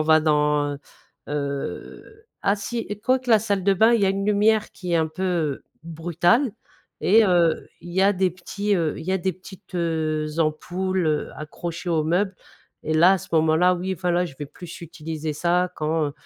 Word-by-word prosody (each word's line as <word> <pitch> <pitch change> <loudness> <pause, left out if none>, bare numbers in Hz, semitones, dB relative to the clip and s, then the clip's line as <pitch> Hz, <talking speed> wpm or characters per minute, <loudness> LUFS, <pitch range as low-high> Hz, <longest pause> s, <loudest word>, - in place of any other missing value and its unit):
va 155 0 +5
dans, 150 -1 +2
heu - - -9 0.5
heu, 145 - -5 0.2
ah 200 +1 +2
si, 235 +4 -4
écoute, 255 +5 0
la 225 -2 +6
salle 200 -3 -1
de 200 - +4
bain 220 +5 +5
il 230 - +3
y - - +4
a - - +3
une 195 0 -2
lumière 210 +1 +3
qui 180 -2 -6
est - - +4
un 160 -1 +2
peu 160 -3 -2 0.2
brutale 175 - +1 0.5
et 220 +3 +5
heu, 175 -4 +2
il 175 - -10
y 190 - +1
a 200 +1 +5
des 185 0 +1
petits, 200 +3 -2
heu, 160 -3 -1
il - - -8
y 185 - -1
a 190 - +1
des 185 +1 -1
petites, 185 +1 -14
heu, 160 -3 -1
ampoules, 175 +3 -1
heu, 150 -1 0
accrochées 170 +3 -6
au 155 -2 +1
meuble 185 +4 +1 0.5
et 155 - -2
là, 175 +4 +6
à 190 - +2
ce - - -11
moment-là, 160 +3 +4
oui 185 +2 -3
enfin, 180 0 -2
là, 175 +1 +2
je 135 - -11
vais 150 - -4
plus 175 +4 -11
utiliser 155 -1 -5
ça 175 +3 +1
quand 155 -1 -1
175 Hz, 200 wpm, -23 LUFS, 155-190 Hz, 0.5 s, la